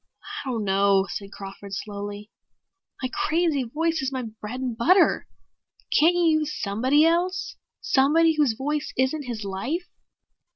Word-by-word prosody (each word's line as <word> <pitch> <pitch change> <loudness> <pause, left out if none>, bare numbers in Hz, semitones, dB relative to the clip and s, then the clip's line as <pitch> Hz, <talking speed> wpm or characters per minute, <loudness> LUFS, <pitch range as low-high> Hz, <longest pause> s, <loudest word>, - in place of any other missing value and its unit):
"I 270 - -6
don't 230 -4 -2
know," 195 0 +3
said 200 -1 -6
Crawford 195 0 -9
slowly. 205 +1 -6 0.7
"My 255 - 0
crazy 320 -3 +1
voice 320 +6 -1
is 265 0 -2
my 260 -1 -3
bread 220 +2 -7
and 255 -3 -3
butter. 350 - +3 0.7
Can't 335 +3 +5
you 330 -3 +3
use 305 -1 -4
somebody 255 +9 +2
else? 365 +4 0 0.3
Somebody 320 -2 +4
whose 295 -6 +2
voice 295 +2 -2
isn't 265 +3 0
his 225 -3 -4
life?" 240 - -3
265 Hz, 140 wpm, -25 LUFS, 210-320 Hz, 0.7 s, Can't